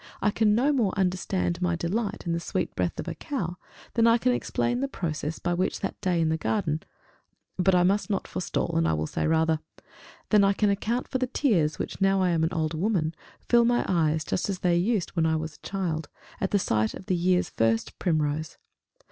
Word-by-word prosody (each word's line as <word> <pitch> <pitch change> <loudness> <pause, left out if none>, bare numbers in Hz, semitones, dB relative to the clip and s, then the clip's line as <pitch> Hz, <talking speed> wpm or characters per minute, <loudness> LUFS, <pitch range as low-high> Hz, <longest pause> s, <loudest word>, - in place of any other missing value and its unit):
I 205 - +2
can 210 0 +3
no 275 +6 +3
more 220 -8 +1
understand 185 -1 0
my 175 -1 +1
delight 200 +5 -2
in 170 - 0
the 170 - 0
sweet - - -3
breath - - -1
of - - -4
a - - -2
cow, 180 - -4 0.4
than 230 -1 +4
I 230 0 +6
can 250 +2 +2
explain 245 0 -1
the 275 - 0
process 160 - -3
by 175 - -1
which, 185 +2 -1
that 195 - -4
day 180 -4 +1
in 160 -1 +2
the 160 - +1
garden 160 -5 -1 0.8
but 185 +1 +4
I 175 - +4
must 200 +4 +1
not 195 -2 -1
forestall, - - -2
and 80 0 +2
will 80 - -1
say - - -2
rather 160 0 +2 0.7
than 210 -2 +6
I 195 0 +4
can 205 0 +2
account 225 +5 -1
for 260 - -2
the 255 - 0
tears 190 - +1
which, - - -5
now 195 0 +3
I 185 -1 +2
am 165 -1 +1
an 160 - +1
old 160 -2 -1
woman, 165 -2 0 0.3
fill 240 -1 +5
my 240 +1 +2
eyes 160 -3 +1
just 185 - -1
as 190 -2 -3
they 175 -1 +3
used 190 +2 +1
when 165 -2 +1
I 160 - +2
was 155 -1 -4
a - - -10
child, 165 -6 -2 0.3
at 200 +1 +1
sight 110 - 0
of 185 - -10
the 185 - +1
year's 180 +1 +2
first 115 0 0
primrose. 155 -3 -1
180 Hz, 215 wpm, -27 LUFS, 160-210 Hz, 0.8 s, I